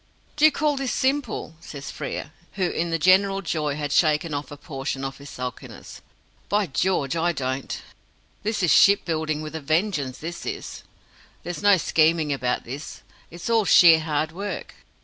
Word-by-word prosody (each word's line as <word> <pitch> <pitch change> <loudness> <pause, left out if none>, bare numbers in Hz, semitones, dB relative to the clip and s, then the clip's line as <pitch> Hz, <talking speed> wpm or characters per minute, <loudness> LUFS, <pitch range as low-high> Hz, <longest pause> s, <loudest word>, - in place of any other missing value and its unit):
"Do 300 - +4
you 310 - +7
call 295 0 0
this 270 -2 -2
simple?" 270 - -1
says 140 -4 -8
Frere, 145 - -5 0.2
who 190 - -2
in 170 +1 -1
the 165 - 0
general 195 +4 +3
joy 150 -5 -1
had 145 -1 -4
shaken 155 0 +2
off 145 -2 -4
a 145 - -9
portion 135 -3 -5
of 135 +1 -6
his 140 0 -11
sulkiness. 125 -2 -8 0.5
"By 205 0 +2
George, 170 -2 0
I 170 +1 +1
don't! 130 -2 -3 0.6
This 210 -1 -1
is 175 - +3
ship 200 +1 +6
building 155 -2 -2
with 155 - -7
a 160 - -5
vengeance, 155 -3 0
this 170 +2 -7
is. - - -6 0.6
There's 175 0 -5
no 205 -1 +6
scheming 160 -2 +2
about 125 -2 -1
this 140 +6 -8 0.3
it's 170 +1 -8
all 230 -1 +3
sheer 170 -4 +7
hard 155 0 -1
work." 200 +5 -6
160 Hz, 170 wpm, -24 LUFS, 145-190 Hz, 0.6 s, you